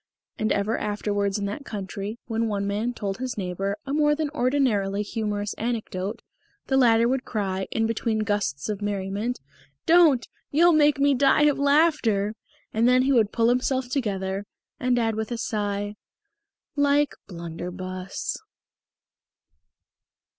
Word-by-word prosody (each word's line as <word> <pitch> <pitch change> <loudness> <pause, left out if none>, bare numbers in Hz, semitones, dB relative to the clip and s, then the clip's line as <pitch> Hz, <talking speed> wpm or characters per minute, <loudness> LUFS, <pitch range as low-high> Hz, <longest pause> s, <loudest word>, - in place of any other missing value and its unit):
And 215 - 0
ever 205 +2 0
afterwards 205 -1 -1
in 200 - -2
that 205 +8 -4
country, 205 -1 -5
when 225 0 -1
one 200 -2 -1
man 210 +4 -1
told 205 -3 -4
his 255 -2 -4
neighbour 195 +1 -2
a 275 - -3
more 295 0 +3
than 305 -1 -2
ordinarily 245 -8 +1
humorous 205 -1 -3
anecdote, 220 -3 -3 0.4
the 265 - 0
latter 235 -3 +5
would 260 +1 0
cry, 190 -3 -2
in 225 - 0
between 225 0 -1
the 215 - 0
gusts 205 -10 -1
of 210 -1 -3
merriment, 205 +4 -2 0.5
"Don't! 320 -7 +5 0.2
You'll 340 +4 +5
make 295 -2 +4
me 280 0 +4
die 275 +2 +4
of 295 -2 +3
laughter!" 280 -9 +3 0.4
And 225 +2 +3
then 255 0 +5
he 275 +1 +2
would 220 -5 +3
pull 230 0 +2
himself 250 +1 0
together, 200 -6 -2 0.3
and 250 -1 +1
add 225 -2 +1
with 220 +1 -4
a 240 - -2
sigh, 205 -2 -2 0.8
"Like 285 0 +3
Blunderbus." 180 +2 -5
220 Hz, 145 wpm, -25 LUFS, 200-260 Hz, 0.8 s, latter